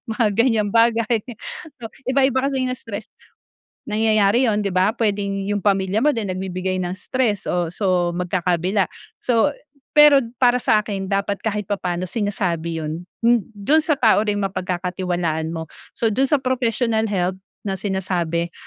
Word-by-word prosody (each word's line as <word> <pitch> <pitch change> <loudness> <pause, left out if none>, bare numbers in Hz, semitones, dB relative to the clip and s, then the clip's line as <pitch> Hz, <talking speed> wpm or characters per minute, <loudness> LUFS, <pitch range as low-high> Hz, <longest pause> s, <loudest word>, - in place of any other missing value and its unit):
mga 225 -4 +2
ganyang 220 -1 +2
bagay. 230 0 +3 0.9
Iba 265 +1 +3
iba 265 -1 +3
kasi 270 0 0
'yung 255 - -1
stress. 220 -4 -7 0.8
Nangyayari 220 +2 +3
yun 210 - +1
di 205 - -1
ba 185 +2 +2
pwedeng 200 -3 -1
'yung 205 -2 -1
pamilya 195 +2 +1
mo 300 - +5
din, 225 -6 -3
nagbibigay 185 0 -3
ng 175 - -3
stress 210 +2 -1
o 175 -2 -1
so 180 -2 +1
magkakabila. 180 +2 0 0.4
So 245 +4 +2 0.4
pero 295 -2 +8 0.2
para 250 0 +3
sa 210 -1 +3
'kin 195 -2 -4
dapat 200 0 -1
kahit 210 -2 -2
papaano 185 -3 -2
sinasabi 180 -5 -2
yun, 155 +2 -4 0.2
m 235 -1 +5
dun 280 +11 +3
sa 305 -2 +1
tao 220 -4 +4
ring 210 -1 0
mapagkakatiwalaan 180 -3 -2
mo. 160 0 -4 0.3
So 225 -2 +1
dun 270 +5 +2
sa 295 - +4
professional 240 -3 0
help 185 -2 0 0.3
na 195 - -1
sinasabi, 175 -4 -2
205 Hz, 150 wpm, -21 LUFS, 185-230 Hz, 0.9 s, pero